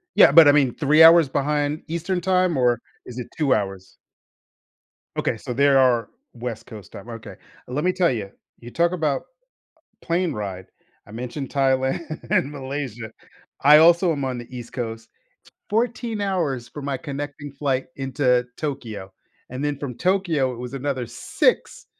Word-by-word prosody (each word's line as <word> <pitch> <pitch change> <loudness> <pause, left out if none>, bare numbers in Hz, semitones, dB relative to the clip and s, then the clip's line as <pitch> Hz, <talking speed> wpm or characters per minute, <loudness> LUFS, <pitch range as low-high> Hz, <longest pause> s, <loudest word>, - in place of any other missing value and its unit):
Yeah, - - +7
but, 165 -3 +8
I - - +8
mean, 140 -4 +3
3 155 +1 +5
hours 165 -3 +8
behind 145 +2 -1
Eastern 170 +3 -2
Time, 185 -2 +2
or 120 -2 +2 0.3
is 125 0 -8
it 125 - -6
2 145 -4 +2
hours? 95 -2 -4 1.2
Okay, 115 - -1
so, 125 +2 -6
there 140 +1 +4
are 120 -4 +3 0.2
West 120 -2 -6
Coast 105 -3 -12
time, 100 +4 -11
okay. 115 -1 -9 0.3
Lemme 150 +9 0
tell 180 -5 +3
ya, 110 -5 -3 0.3
you 120 - -10
talk 170 +4 +2
about 155 -6 -1 0.8
a - - -20
plane 175 0 0
ride, 95 -5 -6 0.4
I 105 - -14
mentioned 125 +4 -6
Thailand 135 0 +1 0.3
and 140 - +2
Malaysia. 130 -5 -6 0.5
I 150 +2 +8
also 170 +2 +5
am 140 -3 -3
on 130 -2 -3
the 120 0 -9
East 120 -1 -9
Coast, 115 -2 -5
t - - -51 0.6
14 230 0 -1
hours 160 -12 -1
for 145 - -9
my 140 -1 -2
connecting 145 +1 -6
flight 135 -2 -1
into 130 -2 +1
Tokyo, 110 -10 -5 0.4
and 130 +3 -4
then 145 -1 -1
from 140 -4 -5
Tokyo, 175 -8 +1
it 120 - -9
was 125 +2 -7
another 135 -2 -2
6 - - -1
135 Hz, 165 wpm, -23 LUFS, 120-155 Hz, 1.2 s, but